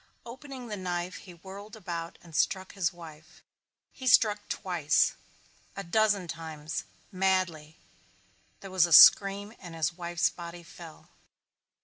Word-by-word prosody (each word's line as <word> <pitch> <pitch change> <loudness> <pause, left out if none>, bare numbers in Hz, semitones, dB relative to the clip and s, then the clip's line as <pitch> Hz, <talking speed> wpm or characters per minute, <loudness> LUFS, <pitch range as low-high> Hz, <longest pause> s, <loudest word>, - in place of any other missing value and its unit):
Opening 260 +1 -9
the 210 -2 -5
knife 180 -1 -4
he 180 -2 -13
whirled 200 +5 -11
about 170 -5 -6
and 165 -3 -13
struck 190 +3 0
his 195 -2 0
wife. 160 -2 -14 0.5
He 260 - -8
struck 210 -3 +4
twice, 170 -6 +1 0.6
a 200 - -5
dozen 205 0 +1
times 160 -1 -6 0.3
madly. 185 -5 -1 0.8
There 195 - -10
was 185 -2 +3
a 170 - 0
scream 200 +5 +7
and 175 -3 -10
his 160 0 -1
wife's 175 0 -1
body 170 0 -9
fell. 165 -1 -13
180 Hz, 130 wpm, -28 LUFS, 165-200 Hz, 0.8 s, scream